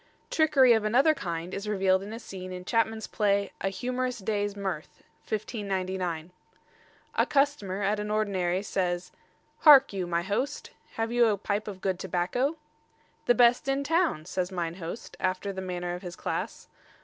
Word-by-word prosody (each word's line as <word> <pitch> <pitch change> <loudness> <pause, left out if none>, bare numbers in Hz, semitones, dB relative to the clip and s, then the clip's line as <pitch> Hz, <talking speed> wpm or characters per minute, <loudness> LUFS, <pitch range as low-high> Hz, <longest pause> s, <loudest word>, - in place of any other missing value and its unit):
Trickery 280 -6 +5
of 220 -2 +2
another 255 +9 +4
kind 175 - -5
is 200 +1 -4
revealed 190 -2 +2
in 200 +2 -7
a 225 - -5
scene 185 -5 -8
in 180 0 -7
Chapman's 225 0 0
play 200 -1 +1
"A 195 - +1
Humorous 250 +4 -2
Day's 205 -1 -2
Mirth," 190 -5 -5 0.3
1599. 190 -6 -3 0.8
A - - +3
customer 275 -10 +1
at 205 +2 +1
an 210 0 -3
ordinary 195 -4 0
says: 180 -3 -2 0.5
"Hark 275 -7 +8
you, 185 -3 -2
my 170 0 0
host, 255 +10 -2 0.2
have 225 0 -2
you 240 -1 +4
a 210 -2 +2
pipe 205 +2 -2
of 195 -3 -7
good 190 -2 -1
tobacco?" 190 - -1 0.7
"The 245 - +5
best 240 +2 +4
in 275 +1 +1
the 280 - -7
town," 325 - +2
says 185 +1 -2
mine 170 -3 -2
host, 175 +5 -7
after 185 +2 -1
the 190 - -5
manner 180 -1 -3
of 180 - -6
his 175 -3 -7
class. - - -4
200 Hz, 170 wpm, -28 LUFS, 185-235 Hz, 0.8 s, Hark